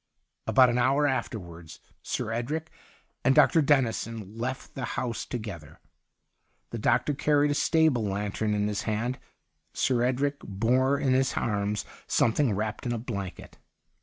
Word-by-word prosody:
' - - -51
About 130 -2 +6
an 120 - 0
hour 140 +4 +3
afterwards 85 - -4 0.2
Sir 110 - -3
Edric 150 +8 -3 0.5
and 135 - +4
Dr. 165 - +6
Dennison 115 -7 0
left 130 +3 -4
the 135 - -5
house 120 -3 -2
together. 95 - -7 0.9
The 115 - -4
doctor 120 +7 +2
carried 145 +1 +2
a - - +2
stable 150 -5 +2
lantern 105 +1 -1
in 105 0 0
his 105 -1 -2
hand. 120 +4 -1 0.5
Sir 125 -2 +1
Edric 135 +3 0
bore 125 +7 +1
in 135 -2 +1
his 130 0 +1
arms 105 -1 -1 0.2
something 120 +2 +2
wrapped 110 +4 -3
in 120 - 0
a - - -2
blanket. 100 -5 -6
120 Hz, 145 wpm, -27 LUFS, 105-135 Hz, 0.9 s, About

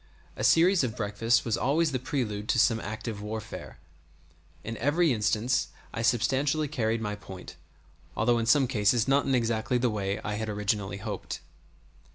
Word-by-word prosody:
A - - -5
series 175 0 +5
of 115 -4 -3
breakfasts 115 +2 +1
was 115 -3 +1
always 150 +4 +1
the 130 - -1
prelude 110 -6 -3
to - - +2
some 115 -1 +4
active 110 -1 -5
warfare.[*] 110 +1 -7 0.9
In 115 - -5
every 150 +5 +2
instance 110 +3 +1 0.3
I 115 - -3
substantially 135 +6 +1
carried 115 -5 -1
my 105 -2 -2
point, 95 -3 -10 0.6
although 120 +2 +3
in 115 - -2
some 135 +3 +5
cases 115 -1 +2
not 140 +1 +3
in 135 - +3
exactly 115 0 0
the 120 -1 +1
way 100 -2 -1
in - - -1
which - - -9
I 105 - -2
had 110 0 -3
originally 105 -1 -1
hoped. 100 -1 -5
115 Hz, 175 wpm, -28 LUFS, 105-130 Hz, 0.9 s, series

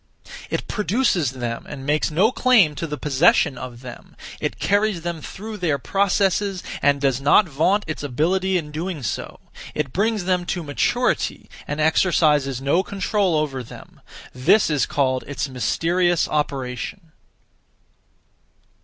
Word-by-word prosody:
It - - -3
produces 205 - 0
them 120 -2 -5
and 135 -2 -7
makes 150 +3 +1
no 185 +9 +3
claim 240 -12 +4
to 165 - -4
the 150 -1 -5
possession 150 +1 +3
of 125 -1 -8
them; 125 -2 -11 0.2
it - - -3
carries 205 -3 +1
them 170 -1 -4
through 215 +7 -8
their 165 -7 0
processes 195 +3 0 0.2
and 140 0 +3
does 135 -2 0
not 145 +8 +5
vaunt 170 +8 +1
its 155 - -5
ability 180 +8 0
in 150 -3 -5
doing 160 -1 -4
so; 105 - -4 0.4
it 150 -4 -2
brings 215 +1 0
them 180 -1 +1
to 175 -3 -2
maturity 240 - -1 0.2
and 145 - -4
exercises 150 -4 +2
no 140 +7 +2
control 195 -1 0
over 145 -4 -1
them; 120 - -13 0.3
this 155 +9 +3
is 145 -3 +1
called 130 -2 0
its 145 +1 -3
mysterious 165 - +1
operation. 145 +4 -3
155 Hz, 140 wpm, -22 LUFS, 140-190 Hz, 0.4 s, not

